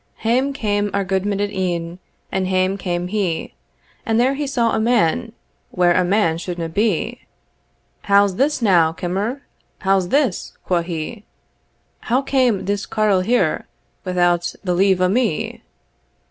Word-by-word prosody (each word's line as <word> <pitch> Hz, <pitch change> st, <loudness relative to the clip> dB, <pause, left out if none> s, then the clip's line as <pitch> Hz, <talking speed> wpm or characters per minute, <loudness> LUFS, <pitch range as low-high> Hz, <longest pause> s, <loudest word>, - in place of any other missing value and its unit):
Hame 255 Hz, +5 st, +2 dB
came 205 Hz, -6 st, -1 dB
our 200 Hz, -1 st, 0 dB
gudeman 195 Hz, +2 st, -1 dB
at 205 Hz, 0 st, -1 dB
e'en, 175 Hz, -2 st, -3 dB, 0.3 s
And 190 Hz, -1 st, -1 dB
hame 185 Hz, +1 st, +1 dB
came 175 Hz, -2 st, -3 dB
he, 190 Hz, -5 st, -2 dB, 0.5 s
And 225 Hz, 0 st, +1 dB
there 255 Hz, +3 st, +3 dB
he 285 Hz, +1 st, -3 dB
saw 235 Hz, -4 st, +1 dB
a -, -, +1 dB
man 225 Hz, -2 st, +1 dB, 0.4 s
Where 175 Hz, -1 st, +3 dB
a 185 Hz, -, +3 dB
man 175 Hz, -3 st, +1 dB
suldna 170 Hz, -2 st, -4 dB
be. 215 Hz, +5 st, -1 dB, 0.8 s
"How's 200 Hz, -1 st, +3 dB
this 275 Hz, -2 st, +1 dB
now, 170 Hz, -6 st, +4 dB
kimmer? 200 Hz, +11 st, -3 dB, 0.4 s
How's 190 Hz, -2 st, +2 dB
this?" 275 Hz, -9 st, 0 dB
quo 175 Hz, -2 st, +1 dB
he, 170 Hz, +5 st, -5 dB, 0.8 s
"How 255 Hz, +4 st, 0 dB
came 255 Hz, -7 st, +1 dB
this 200 Hz, +1 st, -2 dB
carle 210 Hz, -4 st, +2 dB
here 240 Hz, +6 st, +1 dB, 0.4 s
Without 175 Hz, -2 st, +1 dB
the 180 Hz, -2 st, 0 dB
leave 190 Hz, 0 st, +3 dB
o' 185 Hz, -, +4 dB
me?" 215 Hz, -3 st, -1 dB
195 Hz, 145 wpm, -20 LUFS, 180-225 Hz, 0.8 s, now